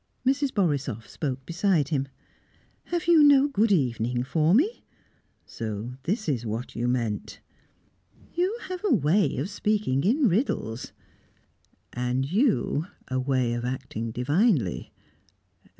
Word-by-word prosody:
Mrs. 275 +1 +2
Borisoff 140 - -1
spoke 135 -3 -4
beside 170 -4 +1
him. 140 -3 0 0.8
"Have 345 0 -2
you 340 -2 +6
no 285 -1 +6
good 225 -6 +1
evening 125 - +1
for 160 +6 +2
me?" 370 - +1 0.6
"So 110 +2 -5
this 215 +5 -1
is 130 -6 0
what 115 +2 -5
you 120 +1 -1
meant?" 115 -4 -2 0.9
"You 370 +6 0
have 370 -1 -6
a 420 - +1
way 165 +8 +2
of 155 +10 -3
speaking 205 -10 0
in 250 - +3
riddles." 175 - -1 1.0
"And 125 +2 -1
you 185 - +1 0.2
a 130 0 0
way 130 -2 0
of 120 0 -3
acting 125 -3 -4
divinely. 125 - +1
145 Hz, 125 wpm, -26 LUFS, -, 1.0 s, you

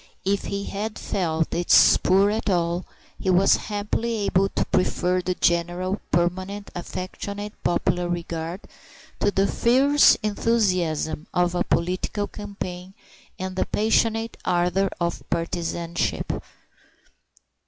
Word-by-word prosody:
If 200 +1 0
he 200 0 -3
had 210 +2 -4
felt 165 -4 -1
its 175 +1 +3
spur 195 +3 +5
at 220 0 -2
all, 175 -1 0 0.3
he 190 - -1
was 185 +1 +5
happily 210 +1 -2
able 195 +1 +2
to - - -1
prefer 180 0 +1
the 180 0 -2
general 175 +3 0
permanent 185 +4 -1
affectionate 200 +4 -6
popular 175 0 0
regard 170 +1 -4 0.6
to - - +2
the 195 -1 +2
fierce 270 +7 +5
enthusiasm 185 -8 0
of 175 0 +2
a 175 - +1
political 185 +4 -1
campaign 190 -3 -7 0.4
and 185 0 -5
the 185 - 0
passionate 225 +1 +1
ardor 180 +2 +1
of 170 -1 -1
partisanship. 170 0 -2
185 Hz, 115 wpm, -24 LUFS, 175-205 Hz, 0.6 s, spur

